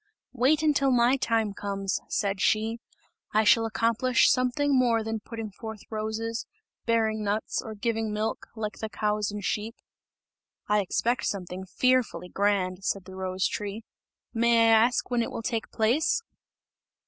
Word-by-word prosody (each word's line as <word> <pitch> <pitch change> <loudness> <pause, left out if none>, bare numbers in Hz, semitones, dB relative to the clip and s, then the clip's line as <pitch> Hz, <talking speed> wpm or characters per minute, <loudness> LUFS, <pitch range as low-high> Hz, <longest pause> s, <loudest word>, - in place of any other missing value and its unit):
"Wait, 270 +5 +3
until 285 -3 +3
my 245 0 +4
time 225 -5 0
comes," 195 -1 -2
said 195 -2 -1
she, 220 +2 +1 0.6
"I 215 - +5
shall 225 +1 +5
accomplish 230 +3 +3
something 260 +3 +1
more 235 -3 +3
than 225 0 -3
putting 225 0 -7
forth 220 +1 -8
roses, 220 +1 -3 0.4
bearing 220 -2 +1
nuts, 210 +1 -1
or 220 -1 -8
giving 225 0 -1
milk, 215 +1 -3
like 215 -2 -4
the 220 - -4
cows 210 +1 -1
and 205 -1 -5
sheep!" 220 +3 -2 0.9
"I 210 0 +3
expect 235 +6 0
something 185 -1 -4
fearfully 255 -3 +1
grand," 195 -2 0
said 195 -1 -1
the 190 - -11
rose 185 0 -1
tree, 210 +2 -5 0.5
"may 230 -1 +4
I 225 0 +7
ask 250 0 -3
when 240 -1 +2
it 230 - -2
will 225 - -6
take 225 -1 -2
place?" 310 - +1
220 Hz, 150 wpm, -27 LUFS, 205-235 Hz, 0.9 s, I